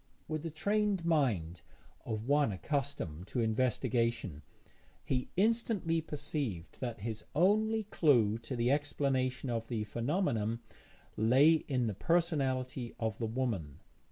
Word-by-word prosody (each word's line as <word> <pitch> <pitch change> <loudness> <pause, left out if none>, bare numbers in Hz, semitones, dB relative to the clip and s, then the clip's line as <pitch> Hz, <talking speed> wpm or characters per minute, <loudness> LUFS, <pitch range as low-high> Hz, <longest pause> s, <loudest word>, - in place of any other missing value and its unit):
With 155 -1 -2
the 165 - -4
trained 200 +2 0
mind 110 - +1 0.5
of 110 0 -3
one 145 -3 +3
accustomed 100 - -3
to 125 - -2
investigation, 115 - 0 0.6
he 125 -1 -1
instantly 205 -6 +2
perceived 145 - -4
that 120 -4 -4
his 110 0 -4
only 215 +6 +3
clue 120 - +3
to 115 +3 -5
the 120 +1 +2
explanation 135 -3 0
of 115 -1 -2
the 110 -3 -2
phenomenon 115 - -1 0.6
lay 130 +9 +6
in 130 -4 +1
the 110 - -1
personality 130 - 0
of 110 -3 -2
the 115 - -1
woman. 110 - -2
130 Hz, 125 wpm, -33 LUFS, 110-155 Hz, 0.6 s, lay